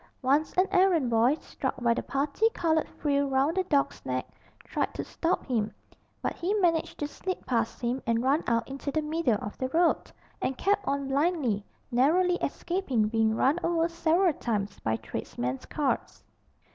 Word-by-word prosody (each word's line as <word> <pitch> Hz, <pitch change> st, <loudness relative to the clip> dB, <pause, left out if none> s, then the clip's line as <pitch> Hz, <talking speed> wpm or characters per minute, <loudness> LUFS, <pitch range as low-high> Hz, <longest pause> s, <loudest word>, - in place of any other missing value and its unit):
Once 285 Hz, +4 st, +2 dB
an 370 Hz, -, +5 dB
errand 355 Hz, -9 st, +3 dB
boy, 230 Hz, +5 st, +4 dB
struck -, -, -4 dB
by 235 Hz, -1 st, +3 dB
the -, -, -2 dB
parti 285 Hz, +11 st, +1 dB
coloured 320 Hz, -2 st, +1 dB
frill 285 Hz, -1 st, 0 dB
round 270 Hz, +5 st, +2 dB
the 375 Hz, -, +2 dB
dog's 285 Hz, -4 st, 0 dB
neck, 130 Hz, 0 st, -2 dB, 0.4 s
tried -, -, -2 dB
to -, -, -3 dB
stop 345 Hz, +2 st, -1 dB
him, 225 Hz, -5 st, 0 dB, 0.5 s
but -, -, 0 dB
he 380 Hz, +5 st, -1 dB
managed 340 Hz, -5 st, +1 dB
to 295 Hz, -, -2 dB
slip 370 Hz, +5 st, -5 dB
past 230 Hz, -2 st, 0 dB
him 245 Hz, +2 st, -1 dB
and 230 Hz, 0 st, +2 dB
run 280 Hz, +5 st, +2 dB
out 230 Hz, -1 st, +1 dB
into 275 Hz, +1 st, -5 dB
the 310 Hz, +2 st, 0 dB
middle 300 Hz, -7 st, +1 dB
of 210 Hz, -, -5 dB
the 260 Hz, -, -1 dB
road, 335 Hz, +4 st, +2 dB, 0.3 s
and 260 Hz, -, -1 dB
kept 405 Hz, +1 st, +1 dB
on 280 Hz, 0 st, 0 dB
blindly, 275 Hz, -, +1 dB, 0.3 s
narrowly 345 Hz, +9 st, +3 dB
escaping 280 Hz, -, -1 dB
being 220 Hz, -1 st, +2 dB
run 275 Hz, +8 st, +2 dB
over 335 Hz, -1 st, +2 dB
several 340 Hz, +1 st, +2 dB
times 205 Hz, -6 st, -3 dB
by 110 Hz, 0 st, 0 dB
tradesmen's 125 Hz, +3 st, -4 dB
carts. 290 Hz, -3 st, -2 dB
280 Hz, 170 wpm, -28 LUFS, 235-335 Hz, 0.5 s, an